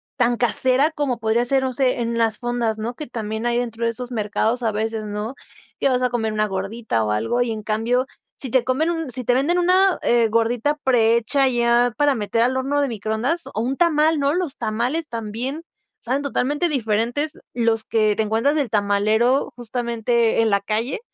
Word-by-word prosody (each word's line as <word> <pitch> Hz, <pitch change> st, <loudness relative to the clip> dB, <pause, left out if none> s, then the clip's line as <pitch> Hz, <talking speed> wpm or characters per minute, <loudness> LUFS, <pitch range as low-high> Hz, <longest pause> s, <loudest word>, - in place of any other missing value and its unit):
tan 240 Hz, -2 st, +1 dB
casera 255 Hz, +5 st, +2 dB
como 285 Hz, -6 st, -2 dB
podría 225 Hz, +2 st, +1 dB
ser, 265 Hz, +2 st, +1 dB
no 260 Hz, -1 st, -1 dB
sé, 255 Hz, -1 st, +1 dB
en 235 Hz, 0 st, -1 dB
las 225 Hz, -1 st, +1 dB
fondas, 240 Hz, -2 st, -1 dB
¿no? 225 Hz, +3 st, -4 dB
Que 305 Hz, -, -7 dB
también 220 Hz, -1 st, -4 dB
hay 240 Hz, 0 st, +1 dB
dentro 235 Hz, -1 st, -3 dB
de 230 Hz, -, +2 dB
esos 245 Hz, +1 st, -7 dB
mercados 220 Hz, +2 st, -1 dB
a 225 Hz, -, +1 dB
veces, 220 Hz, +1 st, -2 dB
¿no? 210 Hz, +4 st, -5 dB, 0.5 s
Que 275 Hz, -, +3 dB
vas 250 Hz, -1 st, +1 dB
a 250 Hz, -, +2 dB
comer 225 Hz, -2 st, -1 dB
una 215 Hz, 0 st, +1 dB
gordita 195 Hz, -, -2 dB
o 105 Hz, -, -1 dB
algo, 115 Hz, -, 0 dB
y 245 Hz, -1 st, 0 dB
en 215 Hz, -1 st, -5 dB
cambio, 225 Hz, +4 st, 0 dB, 0.3 s
si 265 Hz, -, -5 dB
te 260 Hz, -1 st, +3 dB
comen 285 Hz, +6 st, 0 dB
un 325 Hz, -4 st, -2 dB
si 255 Hz, -1 st, -5 dB
te 245 Hz, -, +3 dB
venden 295 Hz, +8 st, +2 dB
una, 370 Hz, +2 st, +3 dB
eh, 235 Hz, -2 st, +3 dB
gordita 230 Hz, +6 st, +1 dB
pre 230 Hz, -3 st, +3 dB
hecha 270 Hz, +4 st, +1 dB
ya 240 Hz, -1 st, +2 dB
para 290 Hz, -2 st, +3 dB
meter 225 Hz, 0 st, -1 dB
al 250 Hz, +2 st, +2 dB
horno 275 Hz, +2 st, 0 dB
de 285 Hz, -, +1 dB
microondas 225 Hz, -, -2 dB
o -, -, -3 dB
un 250 Hz, +4 st, -1 dB
tamal, 320 Hz, -1 st, +3 dB
¿no? 280 Hz, 0 st, +1 dB
Los 345 Hz, -6 st, -2 dB
tamales 240 Hz, +8 st, -2 dB
también 235 Hz, +7 st, -4 dB, 0.4 s
saben 260 Hz, +4 st, -2 dB
totalmente 290 Hz, +3 st, 0 dB
diferentes, 245 Hz, +2 st, -1 dB
los 230 Hz, -2 st, +1 dB
que 215 Hz, -2 st, +2 dB
te 220 Hz, -, +2 dB
encuentras 225 Hz, +7 st, +1 dB
del 285 Hz, -5 st, 0 dB
tamalero 215 Hz, +6 st, +1 dB
justamente 235 Hz, -1 st, 0 dB
en 225 Hz, -, +2 dB
la 200 Hz, -1 st, +3 dB
calle, 220 Hz, +6 st, -2 dB
240 Hz, 200 wpm, -21 LUFS, 220-270 Hz, 0.5 s, Que